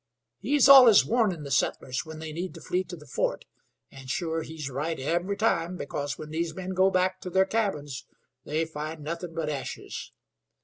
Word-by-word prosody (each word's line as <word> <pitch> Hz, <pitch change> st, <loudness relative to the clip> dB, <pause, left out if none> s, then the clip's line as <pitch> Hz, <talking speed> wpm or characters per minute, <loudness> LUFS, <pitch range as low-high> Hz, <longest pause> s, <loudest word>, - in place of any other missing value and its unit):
He's 285 Hz, -2 st, +3 dB
allus 255 Hz, -6 st, +9 dB
warnin' 210 Hz, -9 st, +1 dB
the 140 Hz, -, -7 dB
settlers 135 Hz, +2 st, 0 dB
when 160 Hz, 0 st, -8 dB
they 155 Hz, -1 st, -7 dB
need 175 Hz, +3 st, -5 dB
to -, -, -9 dB
flee 180 Hz, +1 st, -1 dB
to 180 Hz, -, -8 dB
the 150 Hz, -3 st, -14 dB
fort, -, -, -2 dB, 0.5 s
and 135 Hz, -1 st, -11 dB
sure 165 Hz, +3 st, -1 dB
he's 155 Hz, -2 st, -6 dB
right 145 Hz, +4 st, -3 dB
every 175 Hz, +8 st, -1 dB
time, 180 Hz, -5 st, +1 dB
because 145 Hz, -1 st, -4 dB
when 155 Hz, 0 st, -8 dB
these 165 Hz, 0 st, -2 dB
men 190 Hz, 0 st, -5 dB
go 190 Hz, +1 st, +4 dB
back 185 Hz, 0 st, 0 dB
to 180 Hz, -, -5 dB
their 190 Hz, +1 st, +3 dB
cabins 170 Hz, -, -2 dB, 0.4 s
they 155 Hz, +2 st, -1 dB
find 155 Hz, 0 st, -6 dB
nothin' 165 Hz, +2 st, -5 dB
but 165 Hz, -2 st, -2 dB
ashes. 145 Hz, -3 st, -5 dB
165 Hz, 185 wpm, -27 LUFS, 150-185 Hz, 0.5 s, allus